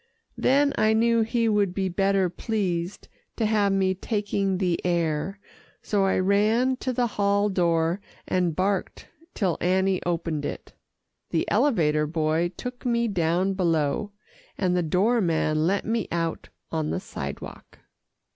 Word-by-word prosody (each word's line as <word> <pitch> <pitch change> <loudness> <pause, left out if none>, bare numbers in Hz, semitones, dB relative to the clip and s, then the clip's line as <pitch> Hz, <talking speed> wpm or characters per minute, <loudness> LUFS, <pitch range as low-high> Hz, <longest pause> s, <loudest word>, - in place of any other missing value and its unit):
Then 280 +2 +3
I 215 0 +4
knew 230 +1 +3
he 230 +1 +1
would 205 -4 +1
be 195 -1 0
better 195 +1 +2
pleased 180 -1 -3 0.3
to 225 - 0
have 210 -2 +2
me 190 -1 +2
taking 200 -1 -1
the 180 -3 -1
air, 170 +2 -1 0.4
so 200 -2 +1
I 190 - +2
ran 215 +7 +2
to 260 - -2
the 245 0 +1
hall 200 -2 +1
door, 170 -1 +1 0.3
and 180 -3 0
barked 190 +1 -2 0.3
till 185 -7 0
Annie 190 +1 +2
opened 165 -3 -2
it. - - -6 0.6
The - - 0
elevator 155 - +2
boy 160 +2 0
took 250 0 -7
me 235 -1 +1
down 180 0 +1
below, 170 +2 0 0.5
and 180 -2 +1
the 180 - +2
door 195 +9 +2
man 160 -3 +1
let 195 +2 0
me 225 -3 -1
out 165 -1 -2 0.2
on 155 -2 -1
the - - -1
sidewalk. - - -8
190 Hz, 145 wpm, -25 LUFS, 170-210 Hz, 0.6 s, I